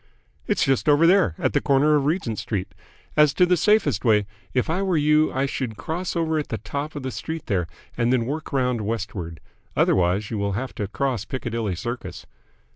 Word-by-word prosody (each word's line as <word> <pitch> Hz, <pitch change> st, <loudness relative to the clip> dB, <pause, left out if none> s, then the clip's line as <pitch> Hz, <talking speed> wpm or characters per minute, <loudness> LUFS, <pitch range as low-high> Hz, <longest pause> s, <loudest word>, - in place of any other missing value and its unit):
"It's -, -, +2 dB
just 135 Hz, +2 st, +1 dB
over 145 Hz, +3 st, +5 dB
there, 180 Hz, -, +4 dB
at -, -, 0 dB
the -, -, +2 dB
corner 140 Hz, +2 st, +3 dB
of 145 Hz, -2 st, +1 dB
Regent 150 Hz, -, -1 dB
Street. 105 Hz, -4 st, -3 dB, 0.4 s
As 150 Hz, -2 st, +4 dB
to 180 Hz, -, +5 dB
the 180 Hz, 0 st, +3 dB
safest 210 Hz, -, +2 dB
way, 105 Hz, -4 st, +3 dB, 0.3 s
if 125 Hz, -, 0 dB
I 170 Hz, +4 st, 0 dB
were 190 Hz, -4 st, +1 dB
you 150 Hz, +1 st, +3 dB
I 135 Hz, +1 st, 0 dB
should 125 Hz, -5 st, -4 dB
cross 175 Hz, +3 st, -4 dB
over 160 Hz, -2 st, +1 dB
at 150 Hz, -, -4 dB
the 110 Hz, -, -3 dB
top 140 Hz, +8 st, -5 dB
of 145 Hz, -, -5 dB
the 130 Hz, -, -3 dB
street 160 Hz, +3 st, -5 dB
there 90 Hz, -4 st, 0 dB, 0.3 s
and 120 Hz, +1 st, +1 dB
then 125 Hz, -3 st, +2 dB
work 150 Hz, +5 st, -4 dB
round 125 Hz, -4 st, 0 dB
westward. 100 Hz, -6 st, -4 dB, 0.4 s
Otherwise 95 Hz, +4 st, +2 dB
you 110 Hz, -, -2 dB
will 100 Hz, 0 st, -1 dB
have 130 Hz, +7 st, -4 dB
to 105 Hz, -, -3 dB
cross 125 Hz, 0 st, -1 dB
Piccadilly 115 Hz, -5 st, -3 dB
Circus." 120 Hz, +8 st, -6 dB
130 Hz, 200 wpm, -24 LUFS, 110-155 Hz, 0.4 s, over